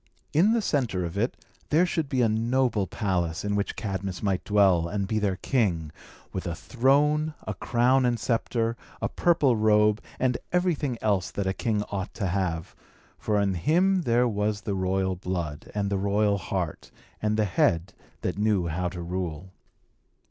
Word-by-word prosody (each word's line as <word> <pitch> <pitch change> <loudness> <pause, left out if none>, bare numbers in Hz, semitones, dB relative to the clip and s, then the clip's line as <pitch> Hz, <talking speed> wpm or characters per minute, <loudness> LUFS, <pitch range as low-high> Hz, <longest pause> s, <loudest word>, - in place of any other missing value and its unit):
In 190 +9 +4
the 230 -2 +1
centre 115 - 0
of 85 +1 -6
it 115 +5 -1 0.3
there 165 +4 +4
should 160 -4 -2
be 130 -3 +2
a - - +4
noble 115 -1 +1
palace, 90 -3 -1
in 105 0 0
which 100 0 -1
Cadmus 95 -3 -4
might 95 -3 0
dwell, 95 -5 +3
and 100 +2 -2
be 110 +1 0
their 100 -3 0
king, 90 - 0 0.4
with 95 - -3
a 85 - -2
throne, 150 - +2
a 105 - -2
crown 125 +6 +2
and 120 -2 +1
sceptre, 115 +1 0 0.2
a - - 0
purple 150 -8 +2
robe, 105 0 +3 0.2
and 125 -1 +1
everything 165 -8 0
else 100 -4 +1
that 100 - -3
a 95 - 0
king 105 -1 -1
ought 100 -1 -4
to 100 - -2
have; 90 -3 -2 0.4
for 105 -1 +1
in 100 -1 +1
him 180 - +2
there 125 -4 +2
was 105 -1 -1
the 100 - -3
royal 95 0 0
blood, 85 -5 -4
and 100 -1 -1
the 100 - +1
royal 100 +1 +2
heart, 90 -3 -4 0.3
and 105 0 +1
the 110 - +3
head 90 -1 +1 0.3
that - - -2
knew 105 -4 +2
how 90 +2 -1
to 90 -1 -6
rule. 90 0 -4
105 Hz, 175 wpm, -26 LUFS, 95-120 Hz, 0.4 s, In